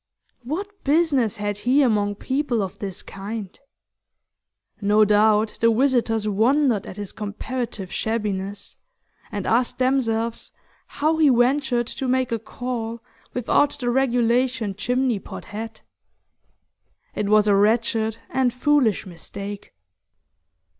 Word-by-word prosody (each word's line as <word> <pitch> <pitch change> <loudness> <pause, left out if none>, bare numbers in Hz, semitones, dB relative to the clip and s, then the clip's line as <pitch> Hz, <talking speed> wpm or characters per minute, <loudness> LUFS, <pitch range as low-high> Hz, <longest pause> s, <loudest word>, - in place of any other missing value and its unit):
What 395 +10 -5
business 280 - +2
had 205 0 -3
he 255 +7 +3
among 205 -4 +1
people 260 -1 -1
of 190 - -7
this 195 -1 -5
kind? 200 0 -7 1.3
No 210 +1 +4
doubt 210 +1 +3
the 230 0 +4
visitors 230 -3 +1
wondered 230 +2 +2
at 190 - -8
his 205 -2 -6
comparative 215 -1 -5
shabbiness, 205 -3 -3 0.5
and 205 -2 -4
asked 240 +2 +1
themselves 235 -3 0 0.4
how 315 +2 0
he 310 -3 +5
ventured 250 0 +2
to 265 +3 -5
make 255 -1 +1
a 230 - 0
call 230 0 -5 0.3
without 265 +4 +2
the 245 -3 -1
regulation 245 -3 +1
chimney 245 +2 0
pot - - -9
hat. 225 +1 -7 1.3
It 205 -1 -2
was 215 0 +5
a 205 - +5
wretched 220 +2 +2
and 260 -2 +2
foolish 250 -3 +2
mistake. 200 +3 -8
230 Hz, 120 wpm, -23 LUFS, 210-255 Hz, 1.3 s, he